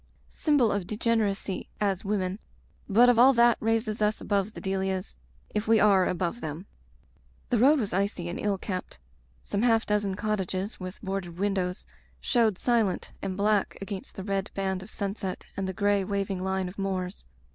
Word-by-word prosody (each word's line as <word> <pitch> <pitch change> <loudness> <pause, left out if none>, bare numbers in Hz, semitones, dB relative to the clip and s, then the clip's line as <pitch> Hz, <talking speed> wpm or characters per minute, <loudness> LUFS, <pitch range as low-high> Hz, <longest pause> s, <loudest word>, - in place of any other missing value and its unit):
Symbol 285 -8 +2
of 195 -3 -2
degeneracy, 210 -3 -1
as 195 -2 0
women; 195 -1 -1 0.5
but 230 +5 +6
of 245 -2 +5
all 260 +3 +8
that 235 -1 +5
raises 225 -1 0
us 210 +1 +2
above 200 +1 0
the - - -8
Delias, 190 -1 -2 0.4
if 210 +1 -1
we 225 0 +5
are 195 -3 +5
above 180 +5 -2
them." 155 +4 -5 0.9
The 240 - +3
road 280 +5 +6
was 210 -7 -2
icy 190 -2 -1
and 175 - -4
ill 205 -2 0
kept. 185 - -5 0.5
Some 200 - -2
half 225 -1 +3
dozen 205 -2 0
cottages 200 -1 -2
with 185 0 -7
boarded 190 -3 -4
windows 190 -2 -1 0.3
showed 225 -6 +2
silent 225 -6 +1
and 190 -1 -3
black 205 0 +1
against 195 -1 -6
the 190 - -6
red 195 0 -1
band 190 -1 -1
of 190 - -10
sunset 200 -2 -4
and 195 -1 -2
the - - -1
gray, 200 +1 +2
waving 195 -1 -2
line 190 -1 -1
of 185 +3 -9
moors. 190 -1 -3
200 Hz, 170 wpm, -28 LUFS, 190-215 Hz, 0.9 s, all